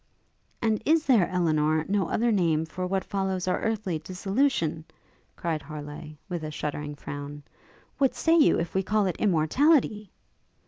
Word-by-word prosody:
'And 220 -2 +1
is 320 +3 +3
there, 230 -10 +4
Elinor, 155 -3 +1
no 195 -3 0
other 235 +1 +1
name 165 -6 +2
for 180 +3 -4
what 190 0 -1
follows 190 -2 -2
our 180 - +1
earthly 215 -7 -1
dissolution?' 185 - -1 0.5
cried 165 -3 -2
Harleigh, 150 0 -8
with 175 -4 -4
a 155 - -4
shuddering 150 0 -4
frown. 145 0 -7 0.6
'What 270 -2 +2
say 325 0 +3
you 315 -3 +5
if 170 0 -3
we 190 - +2
call 210 +1 +1
it 180 -3 -2
immortality?' 210 - +2
180 Hz, 150 wpm, -27 LUFS, 155-215 Hz, 0.6 s, you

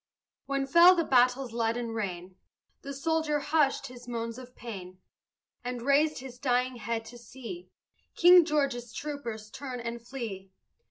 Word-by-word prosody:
When 275 0 0
fell 340 +6 +7
the 335 - +1
battle's 250 -2 +3
leaden 230 0 -1
rain, 185 -4 -4 0.5
The 280 - -7
soldier 315 +1 0
hushed 290 -1 +1
his 245 -1 -11
moans 230 0 -4
of 250 -1 -12
pain 185 -6 -8 0.7
And 245 -1 -4
raised 295 +3 +3
his 250 -1 -9
dying 250 -1 0
head 230 0 -3
to 240 +2 -11
see 260 +9 -9 0.5
King 355 0 +8
George's 275 -7 -1
troopers 235 -8 -6
turn 260 -3 -6
and 235 0 -5
flee. 230 -6 -6
250 Hz, 145 wpm, -29 LUFS, 230-280 Hz, 0.7 s, King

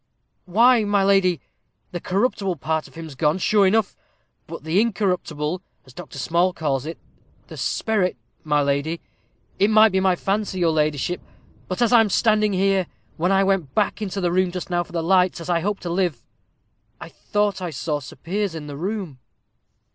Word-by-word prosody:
"Why, 230 +5 +4
my 205 -1 +2
lady, 195 -3 +3 0.5
the 175 - -4
corruptible 195 0 0
part 160 +1 -2
of - - -20
him's 160 -2 -8
gone, 150 +4 +1
sure 200 +1 +3
enough. 215 +1 +1 0.5
But - - -8
the 165 +6 +2
incorruptible, 180 -6 -1 0.2
as 130 - -16
Dr. 140 - -10
Small 170 +6 +1
calls 145 -4 -2
it 165 - -6 0.5
the - - -9
sperrit, 210 -5 0 0.3
my 150 -1 +2
lady. 140 +4 -1 0.6
It 200 - +4
might 215 0 +6
be 190 - +2
my 190 -1 +3
fancy, 195 +1 -2
your 170 -2 +2
ladyship; 155 +2 0 0.5
but 185 +6 -1
as 240 - +2
I'm 225 -3 +6
standing 215 0 +2
here, 190 -1 +2 0.3
when 175 +4 +1
I 195 0 +4
went 190 -8 0
back 210 +1 0
into 200 -1 -3
the 175 -2 0
room 185 +1 +2
just 180 +1 -6
now 175 0 +2
for 175 - -9
the 170 -1 -2
lights, 180 +1 +3
as 165 +1 -4
I 170 - +2
hope 200 +4 -2
to 175 - -5
live, 175 -6 -1 0.7
I - - -8
thought 205 -2 -1
I 180 - -3
saw 155 -1 -3
Sir 130 - -11
Piers 190 +5 -3
in 155 -2 -6
the 145 -1 -7
room." 185 -5 -4
180 Hz, 185 wpm, -22 LUFS, 160-200 Hz, 0.7 s, might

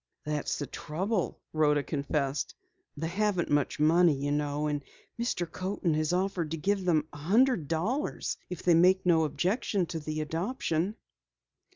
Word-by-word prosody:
"That's 150 -1 -1
the 145 - -3
trouble," 185 +8 -2
Rhoda 150 -2 +3
confessed. 140 -1 -2 0.4
"They 160 - -3
haven't 190 -1 0
much 145 0 +1
money, 165 +1 +5
you 140 +1 -2
know, 145 0 0
and 145 -1 -1 0.4
Mr. 235 -7 0
Coaten 185 -2 -1
has 155 +1 0
offered 180 -3 0
to 165 - -3
give 195 +3 0
them 155 -4 +2
a - - -8
hundred 200 - +3
dollars 195 - -1
if 180 - -6
they 175 - +5
make 185 +3 +5
no 165 -3 +4
objection 190 - 0
to 165 0 -4
the 155 0 -3
adoption." 175 - -1
165 Hz, 155 wpm, -29 LUFS, 150-190 Hz, 0.4 s, money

